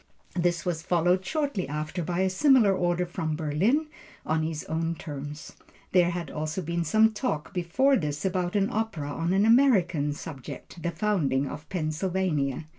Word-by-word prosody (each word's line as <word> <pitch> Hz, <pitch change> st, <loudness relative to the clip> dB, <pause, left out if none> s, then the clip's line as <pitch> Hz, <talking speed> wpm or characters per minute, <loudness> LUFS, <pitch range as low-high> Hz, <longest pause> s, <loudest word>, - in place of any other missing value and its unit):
This 175 Hz, -1 st, 0 dB
was 170 Hz, -3 st, -1 dB
followed 180 Hz, +2 st, +2 dB
shortly 285 Hz, -, -1 dB
after 155 Hz, +4 st, -3 dB
by 175 Hz, +2 st, -1 dB
a 190 Hz, -, +2 dB
similar 235 Hz, -1 st, +5 dB
order 175 Hz, -1 st, +1 dB
from 160 Hz, -3 st, -3 dB
Berlin 170 Hz, -, +1 dB, 0.4 s
on 160 Hz, 0 st, +1 dB
his 155 Hz, -1 st, -3 dB
own 165 Hz, +1 st, -2 dB
terms. 145 Hz, -1 st, -7 dB, 0.4 s
There 175 Hz, -2 st, +4 dB
had 175 Hz, -1 st, -4 dB
also 155 Hz, +4 st, -3 dB
been 170 Hz, +1 st, -1 dB
some 220 Hz, +7 st, +4 dB
talk 210 Hz, -, -3 dB
before 220 Hz, +11 st, +2 dB
this 150 Hz, -, -2 dB
about 180 Hz, 0 st, -1 dB
an 200 Hz, -1 st, +2 dB
opera 210 Hz, -10 st, -2 dB
on 165 Hz, +4 st, -1 dB
an 195 Hz, +2 st, +3 dB
American 190 Hz, -, +4 dB
subject, 145 Hz, +3 st, -9 dB
the 170 Hz, -, -1 dB
Founding 165 Hz, -8 st, 0 dB
of 150 Hz, +3 st, -8 dB
Pennsylvania. 160 Hz, -4 st, -1 dB
175 Hz, 160 wpm, -27 LUFS, 155-190 Hz, 0.4 s, similar